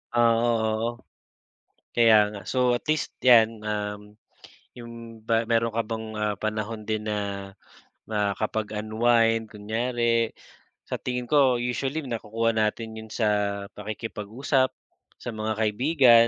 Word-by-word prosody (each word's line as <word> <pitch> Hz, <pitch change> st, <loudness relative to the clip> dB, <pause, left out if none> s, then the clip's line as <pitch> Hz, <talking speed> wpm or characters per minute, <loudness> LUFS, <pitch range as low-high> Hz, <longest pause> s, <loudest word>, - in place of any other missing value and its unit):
Ah, 120 Hz, -1 st, +5 dB
oh, 120 Hz, 0 st, +2 dB, 0.4 s
oo. -, -, -22 dB, 0.9 s
Kaya 110 Hz, -3 st, +5 dB
nga. 100 Hz, -, -7 dB
So, 125 Hz, +1 st, +2 dB
at -, -, -32 dB
least 155 Hz, 0 st, 0 dB
yan, 115 Hz, -3 st, +5 dB
um, 105 Hz, 0 st, -4 dB, 0.6 s
yung 115 Hz, -1 st, -10 dB
ba 115 Hz, 0 st, +1 dB
meron 115 Hz, 0 st, +1 dB
ka 115 Hz, -, +2 dB
bang, 110 Hz, 0 st, -4 dB
ah, 105 Hz, -1 st, 0 dB
panahon 110 Hz, 0 st, -3 dB
din 110 Hz, 0 st, -1 dB
na 100 Hz, -2 st, -3 dB, 0.6 s
makapag-unwind 110 Hz, +2 st, +1 dB
kunyari? 115 Hz, +2 st, 0 dB, 0.6 s
Sa -, -, -3 dB
tingin 125 Hz, 0 st, -3 dB
ko 135 Hz, -3 st, +4 dB
usually 135 Hz, +5 st, -2 dB
nakukuha 115 Hz, -2 st, -1 dB
natin 110 Hz, +1 st, -1 dB
yun 110 Hz, -, -9 dB
sa 105 Hz, -2 st, 0 dB
pakikipag-usap 115 Hz, +5 st, -1 dB, 0.5 s
sa -, -, -6 dB
mga 110 Hz, 0 st, -2 dB
kaibigan. 115 Hz, +1 st, +5 dB
115 Hz, 120 wpm, -26 LUFS, 105-120 Hz, 0.9 s, Ah